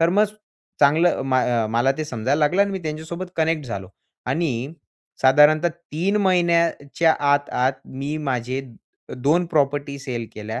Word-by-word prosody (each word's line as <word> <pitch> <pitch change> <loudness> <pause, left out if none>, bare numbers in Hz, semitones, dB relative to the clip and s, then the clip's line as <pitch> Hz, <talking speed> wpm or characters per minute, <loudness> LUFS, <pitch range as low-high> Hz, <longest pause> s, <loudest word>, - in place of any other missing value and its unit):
तर 165 - +4
मग 205 +4 +4 0.6
चांगलं 155 +5 +4
म 130 -1 -1 0.4
मला 120 +4 +2
ते 155 - -1
समजायला 130 +1 -1
लागलं 165 +6 +3
आणि 200 - -1
मी 190 - -3
त्यांच्यासोबत 160 +4 -5
कनेक्ट 160 -3 0
झालो 100 -5 -6 0.4
आणि 135 -1 -1 0.5
साधारणतः 150 +5 +5
3 170 +4 -3
महिन्याच्या 170 -4 +2
आत, 145 0 +2
आत 130 +2 +1
मी 140 +3 -5
माझे 130 -2 -2 0.6
2 155 +8 +2
प्रॉपर्टी 145 -3 0
सेल 120 -4 -5
केल्या. 110 +1 -5
150 Hz, 140 wpm, -22 LUFS, 130-170 Hz, 0.6 s, साधारणतः